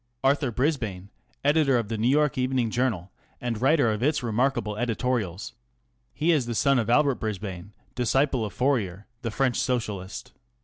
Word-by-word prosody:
Arthur 135 0 +2
Brisbane, 115 - -2 0.4
editor 145 -3 +4
of 115 -3 -1
the 115 - -3
Neiv 110 +3 +1
York 150 +1 +3
Evening 130 -3 0
Journal 110 -8 -1 0.3
and 120 -3 -3
writer 135 -3 +4
of 105 0 -3
its 145 0 +1
remarkable 120 -2 0
editorials. 115 -4 -2 0.6
He 160 +3 +1
is 145 -7 +2
the 120 - -3
son 140 +2 +3
of 115 -1 -1
Albert 140 +1 +3
Brisbane, 100 -3 -5 0.2
disciple 130 0 +1
of 105 - -3
Fourier, 105 -8 0 0.2
the 115 - -2
French 125 +2 0
socialist. 105 -6 -3
120 Hz, 160 wpm, -26 LUFS, 105-135 Hz, 0.6 s, editor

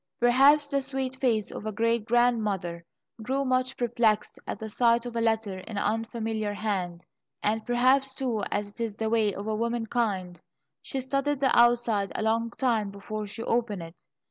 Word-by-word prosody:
Perhaps 275 +5 +5
the 280 0 +1
sweet 265 -1 -3
face 230 -6 +1
of 215 - -6
a - - -1
great 230 +1 0
grandmother 215 -8 +1 0.4
grew 270 +5 -1
much 255 0 0
perplexed 235 -3 +1
at - - -3
the 220 - -6
sight 235 +2 +2
of 240 -1 -6
a 230 - 0
letter 220 -4 0
in 205 +3 -8
an - - 0
unfamiliar 220 -1 -2
hand, 185 -5 -3 0.4
and 215 +1 0
perhaps, 260 +3 +3
too, 245 -5 -1
as 205 0 -2
is 225 -3 -2
the 220 0 -2
way 220 -3 +3
of 200 +1 -6
womankind, 220 -4 -1 0.4
she 270 - -4
studied 275 +2 -1
the 265 -2 +2
outside 235 -4 +3
a - - -1
long 225 +1 +1
time 230 -5 0
before 210 +1 -6
she 225 +3 -6
opened 225 -7 -1
it. 165 +1 -13
225 Hz, 170 wpm, -27 LUFS, 210-245 Hz, 0.4 s, Perhaps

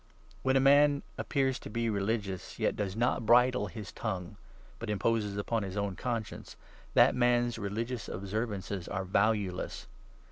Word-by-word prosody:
When 130 0 +2
26 - - +6
a 135 - +3
man 145 +1 +5 0.2
appears 135 -3 0
to - - -9
be 115 +2 -1
religious, 100 -3 -2
yet - - +1
does 100 -2 -3
not 120 +1 +1
bridle 120 0 +4
his 95 +2 -8
tongue, 95 -6 -4 0.4
but 115 - -5
imposes 105 0 0
upon 110 +2 -1
his 95 0 -5
own 100 -2 -1
conscience, 115 -2 -4 0.4
that - - +6
man's 120 -1 +2
religious 115 +4 -3
observances 100 -2 -3
are 95 0 -3
valueless. 100 -1 0
110 Hz, 150 wpm, -31 LUFS, 100-120 Hz, 0.4 s, 26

